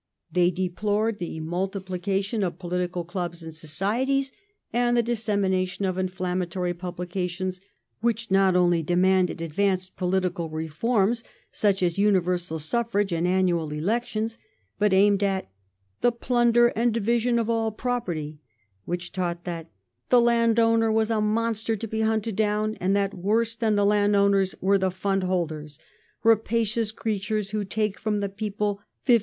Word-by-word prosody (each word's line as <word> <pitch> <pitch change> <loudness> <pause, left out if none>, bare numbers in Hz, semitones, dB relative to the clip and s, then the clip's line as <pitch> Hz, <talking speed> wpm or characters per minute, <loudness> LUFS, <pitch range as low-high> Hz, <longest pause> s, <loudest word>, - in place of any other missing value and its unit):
They 175 +1 +3
deplored 205 +4 -1
the 170 -2 -5
mul 175 +4 -1
tiplication 195 +2 -2
of 175 -3 -2
political 180 -1 -2
clubs 175 -1 -5
and 160 0 -8
societies 230 - -1 0.4
and 240 0 +2
the 235 - +4
dissemination 200 -5 0
of 185 -1 -1
inflammatory 180 -1 -2
publications 180 +1 -4 0.4
which 230 -1 -1
not 195 -1 +4
only 175 -2 +3
demanded 180 +1 +2
advanced 185 +3 -1
political 180 -2 -1
reforms, 195 +9 0 0.3
such 195 -3 +1
as 175 +1 +1
universal 180 -4 +1
suffi'age 205 +3 0
and 170 +2 0
annual 180 -4 +1
elections, 220 +7 -2 0.4
but 210 -1 +3
aimed 200 +1 +4
at 195 - -1 0.5
"the 245 - +3
plunder 240 0 +3
and 235 0 0
division 235 +2 +1
of 230 -2 0
all 225 -1 0
property"; 175 - -3 0.4
which 175 0 -4
taught 175 -2 -3
that 170 -2 -5 0.2
" 120 +1 -52
the 250 - +6
landowner 230 -1 +3
was 220 0 +1
a 220 -1 +1
monster 225 +1 0
to 225 +2 -5
be 220 +1 -2
hunted 220 -1 0
down," 215 0 +1
and 190 +2 +2
that 200 -1 +1
woi"se 220 +5 0
than 220 -2 +2
the 205 0 +3
landowners 200 -2 +3
were 195 +1 +3
the 190 0 +1
fund 195 +1 -1
holders, 160 -5 -2 0.5
"rapacious 225 0 +2
creatures 215 -1 -2
who 215 -1 -1
take 210 +1 -2
from 210 -1 -1
the 200 -1 -2
people 205 0 -3 0.2
15d. 240 -3 +6
195 Hz, 145 wpm, -25 LUFS, 180-220 Hz, 0.5 s, the